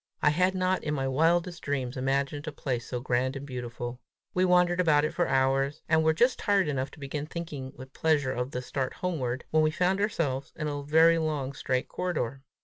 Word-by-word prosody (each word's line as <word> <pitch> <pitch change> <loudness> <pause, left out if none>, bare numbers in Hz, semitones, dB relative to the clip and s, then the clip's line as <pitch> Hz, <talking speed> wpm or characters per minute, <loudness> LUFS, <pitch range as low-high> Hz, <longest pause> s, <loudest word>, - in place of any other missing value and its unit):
I 150 - +6
had 185 +4 +2
not, 185 0 +1
in 150 0 -1
my 135 -1 -1
wildest 170 +5 +1
dreams, 135 -3 -2
imagined 140 +3 -1
a - - -2
place 125 -4 -3
so 125 - -3
grand 130 +2 0
and 135 +1 -6
beautiful. 120 -2 -6 0.3
We 185 +1 +3
wandered 180 -1 +3
about 155 -4 +4
it 155 - -2
for 175 - +1
hours, 135 +2 +1
and 160 0 +3
were 160 - +4
just 245 +9 +3
tired 200 -4 +2
enough 135 -2 -1
to - - -13
begin 145 +1 -4
thinking 150 -6 -6
with 130 +1 -11
pleasure 150 -5 +1
of 125 +1 -2
the 125 -2 -4
start 130 +1 -3
homeward, 130 -9 -2
when 155 - +4
we 155 - +4
found 180 +5 +1
ourselves 145 -10 -1
in 155 - -3
a 145 -1 -3
very 160 +3 +5
long, 150 -4 -2
straight 130 0 -1
corridor. 140 -8 -3
145 Hz, 210 wpm, -28 LUFS, 130-165 Hz, 0.3 s, I